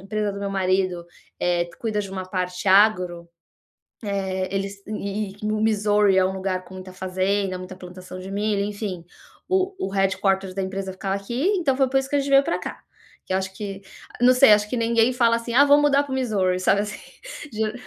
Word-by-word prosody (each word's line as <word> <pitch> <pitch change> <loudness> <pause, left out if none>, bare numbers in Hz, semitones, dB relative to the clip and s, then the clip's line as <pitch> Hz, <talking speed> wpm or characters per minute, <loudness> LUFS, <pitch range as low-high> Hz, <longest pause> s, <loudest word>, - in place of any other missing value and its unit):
empresa 205 +1 -2
do 200 - -7
meu 200 - -2
marido, 185 -2 0 0.4
eh, 175 -1 +1
cuida 215 -2 -1
de 195 -2 -6
uma 190 -1 -5
parte 180 0 -3
agro, 180 -4 +3 0.8
eh, 190 -2 -2
eles 195 0 -3
e 205 -1 -4
e 215 - -1
o 215 - -1
Missouri 210 -2 +3
é 190 - +5
um 190 - 0
lugar 190 -1 -3
com 185 +1 -13
muita 185 0 -9
fazenda, 190 +1 -1
muita 185 +1 -8
plantação 185 0 -10
de 190 +1 -8
milho, 205 0 0
enfim, 200 -4 -5 0.4
o 380 +1 +1
o - - -2
headquarters 195 -1 0
da 195 - -2
empresa 190 0 -4
ficava 190 +1 -3
aqui, 235 - -3
então 275 -6 +1
foi 270 -1 +2
por 270 - +3
isso 270 0 -3
que - - -4
a - - +3
gente 275 0 -3
veio 275 0 +6
pra 335 - -1
cá. - - -6 0.5
Que - - -4
eu - - +3
acho 190 0 -4
que 200 -2 -6 0.4
não 250 +1 +6
sei, 250 -4 +7
acho 210 0 +3
que 250 - -1
ninguém 230 +1 +2
fala 235 -2 +3
assim: 230 0 -5
"Ah, 285 - +7
vou 290 +1 +6
mudar 285 -1 +3
para 275 - -8
o - - 0
Missouri.", 195 -8 0
sabe 200 +2 +3
assim. 210 0 -6 0.5
Dio 215 0 -1
200 Hz, 215 wpm, -23 LUFS, 185-220 Hz, 0.8 s, sei